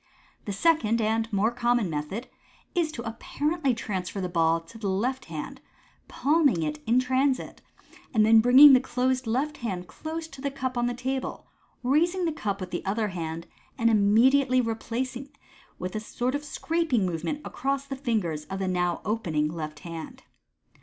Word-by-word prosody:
The 205 Hz, -, -3 dB
second 230 Hz, -, +2 dB
and 225 Hz, +1 st, 0 dB
more 210 Hz, +3 st, +2 dB
common 240 Hz, -2 st, +1 dB
method 165 Hz, +10 st, -4 dB, 0.5 s
is 335 Hz, -4 st, +1 dB
to 235 Hz, -3 st, -6 dB
apparently 280 Hz, +4 st, -1 dB
transfer 195 Hz, -4 st, -4 dB
the 185 Hz, -, -1 dB
ball 165 Hz, -1 st, +2 dB
to 165 Hz, +7 st, -14 dB
the 205 Hz, -3 st, -2 dB
left 250 Hz, +8 st, -1 dB
hand, -, -, -7 dB, 0.5 s
palming 285 Hz, -, +2 dB
it 150 Hz, -1 st, -3 dB
in 235 Hz, +2 st, +4 dB
the 255 Hz, -, +2 dB
transit, 260 Hz, +1 st, 0 dB, 0.5 s
and 215 Hz, -4 st, +4 dB
then 225 Hz, 0 st, +7 dB
bringing 260 Hz, +5 st, +9 dB
the 255 Hz, -, +7 dB
closed 255 Hz, 0 st, -1 dB
left 275 Hz, +6 st, -1 dB
hand 185 Hz, -7 st, -4 dB
close 320 Hz, -, -6 dB
to 270 Hz, -, -11 dB
the 280 Hz, -, -1 dB
cup 260 Hz, -2 st, -4 dB
on 240 Hz, 0 st, +1 dB
the 245 Hz, -, -2 dB
table, 260 Hz, +2 st, -3 dB, 0.4 s
raise 305 Hz, +8 st, +3 dB
the 360 Hz, -3 st, 0 dB
cup 200 Hz, -8 st, -2 dB
with 185 Hz, -1 st, -6 dB
the 175 Hz, -, -3 dB
other 210 Hz, +2 st, -1 dB
hand, 165 Hz, -2 st, -5 dB, 0.3 s
and 230 Hz, -2 st, +3 dB
immediately 250 Hz, +6 st, +4 dB
replace 235 Hz, +2 st, -2 dB
it 275 Hz, +3 st, -9 dB, 0.4 s
with 180 Hz, +2 st, -5 dB
a -, -, 0 dB
sort 245 Hz, +3 st, -3 dB
of 290 Hz, +1 st, -2 dB
scraping 295 Hz, -, 0 dB
movement 175 Hz, -, -2 dB
across 275 Hz, +1 st, -2 dB
the 275 Hz, -, -5 dB
fingers 210 Hz, -, -2 dB
of 195 Hz, -, -5 dB
the 190 Hz, -1 st, -2 dB
now 180 Hz, -1 st, 0 dB
opening 165 Hz, -8 st, 0 dB
left 155 Hz, -2 st, -6 dB
hand. 165 Hz, -2 st, -8 dB
230 Hz, 175 wpm, -27 LUFS, 190-265 Hz, 0.5 s, bringing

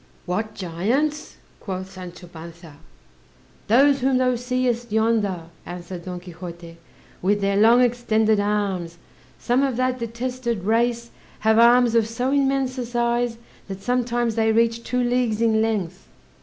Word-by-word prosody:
"What 215 Hz, +4 st, -3 dB
giants?" 235 Hz, -, -2 dB, 0.2 s
quoth 190 Hz, -1 st, -6 dB
Sancho 180 Hz, -2 st, -10 dB
Panza. 165 Hz, -2 st, -12 dB, 0.9 s
"Those 275 Hz, +5 st, +4 dB
whom 260 Hz, 0 st, +2 dB
thou 255 Hz, -1 st, +2 dB
seest 245 Hz, -1 st, -1 dB
yonder," 215 Hz, -5 st, +1 dB, 0.2 s
answered 175 Hz, 0 st, -8 dB
Don 180 Hz, -1 st, -5 dB
Quixote, 170 Hz, -1 st, -10 dB, 0.4 s
"with 205 Hz, +3 st, +1 dB
their 200 Hz, 0 st, 0 dB
long 225 Hz, +4 st, +5 dB
extended 220 Hz, -3 st, +2 dB
arms; 200 Hz, -5 st, -1 dB, 0.4 s
some 245 Hz, -, +1 dB
of 270 Hz, -4 st, 0 dB
that 255 Hz, 0 st, 0 dB
detested 235 Hz, -2 st, -3 dB
race 235 Hz, +2 st, 0 dB, 0.3 s
have 220 Hz, +1 st, +3 dB
arms 240 Hz, 0 st, +5 dB
of 230 Hz, -2 st, +3 dB
so 245 Hz, +3 st, -2 dB
immense 270 Hz, -2 st, +1 dB
a 245 Hz, -, -2 dB
size, 240 Hz, 0 st, 0 dB, 0.3 s
that 195 Hz, -1 st, -8 dB
sometimes 240 Hz, -1 st, 0 dB
they 220 Hz, 0 st, +2 dB
reach 230 Hz, +1 st, +1 dB
two 250 Hz, 0 st, -1 dB
leagues 240 Hz, -3 st, 0 dB
in 225 Hz, -1 st, +2 dB
length." 195 Hz, -5 st, -2 dB
225 Hz, 140 wpm, -23 LUFS, 190-245 Hz, 0.9 s, long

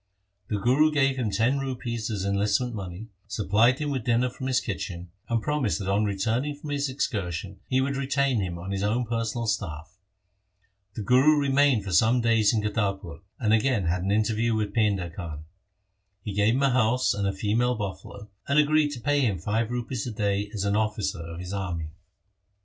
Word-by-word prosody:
The 105 Hz, -, -1 dB
Guru 130 Hz, +9 st, +3 dB
gave 135 Hz, -2 st, +2 dB
him 120 Hz, -4 st, 0 dB
ten 115 Hz, +7 st, +1 dB
rupees 120 Hz, -4 st, -3 dB
as 100 Hz, -3 st, -2 dB
enlistment 100 Hz, +5 st, +1 dB
money, 100 Hz, +1 st, -7 dB, 0.2 s
supplied 110 Hz, +5 st, +2 dB
him 150 Hz, -1 st, -2 dB
with 130 Hz, -4 st, -2 dB
dinner 120 Hz, +2 st, +1 dB
from 130 Hz, +1 st, -6 dB
his 130 Hz, -1 st, +2 dB
kitchen, 90 Hz, -4 st, -5 dB, 0.2 s
and 115 Hz, -1 st, 0 dB
promised 150 Hz, -2 st, 0 dB
that 100 Hz, -, -5 dB
on 100 Hz, +2 st, +2 dB
returning 115 Hz, +8 st, -1 dB
from 145 Hz, 0 st, -8 dB
his 145 Hz, -1 st, -1 dB
excursion 95 Hz, -, -3 dB
he 130 Hz, 0 st, +2 dB
would 140 Hz, +1 st, -1 dB
retain 135 Hz, -2 st, +1 dB
him 90 Hz, -3 st, -3 dB
on 90 Hz, +3 st, -6 dB
his 95 Hz, 0 st, -2 dB
own 110 Hz, +5 st, 0 dB
personal 115 Hz, 0 st, -2 dB
staff. 95 Hz, -4 st, -4 dB, 1.0 s
The 110 Hz, -, -4 dB
Guru 130 Hz, +7 st, +5 dB
remained 140 Hz, -5 st, +3 dB
for 95 Hz, -, -5 dB
some 110 Hz, +9 st, +4 dB
days 115 Hz, -3 st, +3 dB
in 110 Hz, -3 st, 0 dB
Kartarpur, 100 Hz, -5 st, -2 dB, 0.2 s
and 110 Hz, -3 st, +2 dB
again 115 Hz, -3 st, +2 dB
had 85 Hz, +2 st, 0 dB
an 95 Hz, -, -2 dB
interview 110 Hz, +2 st, +1 dB
with 105 Hz, -2 st, -2 dB
Painda 100 Hz, -6 st, +1 dB
Khan. 80 Hz, -4 st, -7 dB, 0.8 s
He 105 Hz, -, -4 dB
gave 105 Hz, +3 st, +3 dB
him 135 Hz, -, +1 dB
a 135 Hz, -, +4 dB
house 125 Hz, +1 st, +2 dB
and 100 Hz, -1 st, -1 dB
a -, -, +1 dB
female 110 Hz, +5 st, 0 dB
buffalo, 100 Hz, 0 st, -6 dB, 0.2 s
and 140 Hz, -, +1 dB
agreed 150 Hz, 0 st, +4 dB
to 125 Hz, -, -6 dB
pay 145 Hz, +4 st, +2 dB
him 110 Hz, -8 st, +1 dB
five 110 Hz, +7 st, -1 dB
rupees 120 Hz, -1 st, -3 dB
a -, -, -3 dB
day 100 Hz, -1 st, -1 dB
as 105 Hz, -2 st, -3 dB
an 100 Hz, 0 st, +1 dB
officer 105 Hz, -3 st, -1 dB
of 85 Hz, 0 st, -7 dB
his 90 Hz, +2 st, -6 dB
army. 85 Hz, -5 st, -3 dB
110 Hz, 195 wpm, -26 LUFS, 100-125 Hz, 1.0 s, Guru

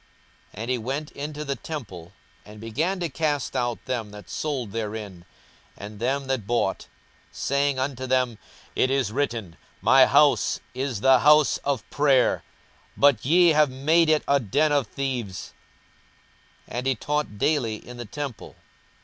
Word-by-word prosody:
42:019:045 105 Hz, -, -7 dB
And 120 Hz, -, -3 dB
he 125 Hz, -, +1 dB
went 135 Hz, +6 st, -4 dB
into 150 Hz, +1 st, -6 dB
the 140 Hz, -1 st, -2 dB
temple, 100 Hz, -, -8 dB, 0.3 s
and 105 Hz, 0 st, -13 dB
began 155 Hz, -, -2 dB
to 170 Hz, -, 0 dB
cast 150 Hz, -2 st, -2 dB
out 120 Hz, -1 st, -2 dB
them 120 Hz, -5 st, -3 dB
that 105 Hz, -4 st, -12 dB
sold 135 Hz, -8 st, -3 dB
therein, 105 Hz, -5 st, -5 dB, 0.5 s
and 105 Hz, +1 st, -9 dB
them 135 Hz, +4 st, -1 dB
that 130 Hz, -6 st, -2 dB
bought; 115 Hz, -5 st, -1 dB, 0.4 s
42:019:046 -, -, -33 dB
Saying 140 Hz, 0 st, 0 dB
unto 130 Hz, -1 st, -3 dB
them, 125 Hz, -3 st, +1 dB, 0.4 s
It 130 Hz, -, +2 dB
is 135 Hz, -5 st, 0 dB
written, 115 Hz, -9 st, -3 dB, 0.2 s
My -, -, +6 dB
house -, -, +4 dB
is 130 Hz, -5 st, -3 dB
the 135 Hz, 0 st, +6 dB
house 150 Hz, +2 st, +5 dB
of 140 Hz, -6 st, -2 dB
prayer: 140 Hz, -3 st, +3 dB, 0.6 s
but 140 Hz, -6 st, +4 dB
ye 175 Hz, +4 st, +5 dB
have 150 Hz, -2 st, +4 dB
made 155 Hz, +5 st, +2 dB
it 155 Hz, -1 st, +3 dB
a 140 Hz, 0 st, +4 dB
den 140 Hz, +7 st, +1 dB
of 140 Hz, -5 st, +1 dB
thieves. 125 Hz, -9 st, -4 dB, 1.1 s
42:019:047 -, -, -6 dB
And 125 Hz, -, -3 dB
he 135 Hz, -, +2 dB
taught 150 Hz, -3 st, -2 dB
daily 125 Hz, -3 st, +1 dB
in 120 Hz, +3 st, -11 dB
the 120 Hz, -, -6 dB
temple. 140 Hz, +1 st, -7 dB
130 Hz, 160 wpm, -25 LUFS, 110-145 Hz, 1.1 s, My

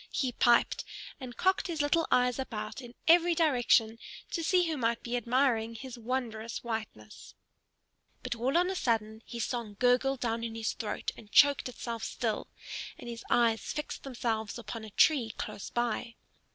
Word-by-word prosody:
he 260 Hz, -3 st, 0 dB
piped, 240 Hz, -1 st, +3 dB, 0.4 s
and 250 Hz, -3 st, -8 dB
cocked 380 Hz, +3 st, +2 dB
his 335 Hz, -3 st, -4 dB
little 300 Hz, +3 st, +2 dB
eyes 250 Hz, 0 st, +3 dB
about 215 Hz, -2 st, -4 dB
in 240 Hz, -1 st, -11 dB
every 340 Hz, +1 st, +6 dB
direction, 245 Hz, -7 st, +3 dB, 0.3 s
to 335 Hz, -, -2 dB
see 360 Hz, +2 st, +4 dB
who 320 Hz, -, -1 dB
might 235 Hz, -3 st, 0 dB
be 240 Hz, +1 st, -2 dB
admiring 240 Hz, -1 st, +1 dB
his 255 Hz, +2 st, -7 dB
wondrous 230 Hz, -2 st, -3 dB
whiteness. 220 Hz, -, -6 dB, 0.9 s
But -, -, -2 dB
all 250 Hz, +6 st, +1 dB
on 360 Hz, +2 st, +3 dB
a -, -, -3 dB
sudden 220 Hz, -6 st, 0 dB
his 235 Hz, -2 st, -3 dB
song 235 Hz, -4 st, -4 dB
gurgled 255 Hz, +2 st, +3 dB
down 230 Hz, -1 st, -1 dB
into 225 Hz, -1 st, -4 dB
his 220 Hz, -1 st, -1 dB
throat 215 Hz, -, -3 dB
and 210 Hz, -2 st, -14 dB
choked 285 Hz, -3 st, +5 dB
itself 235 Hz, -2 st, -5 dB
still, -, -, -2 dB, 0.5 s
and -, -, -10 dB
his 230 Hz, 0 st, -8 dB
eyes 230 Hz, -3 st, +3 dB
fixed 300 Hz, -, -4 dB
themselves 230 Hz, -5 st, -2 dB
upon 230 Hz, -1 st, -6 dB
a 220 Hz, -, -8 dB
tree 235 Hz, 0 st, +3 dB
close -, -, -5 dB
by. 240 Hz, 0 st, -2 dB
240 Hz, 165 wpm, -30 LUFS, 225-270 Hz, 0.9 s, every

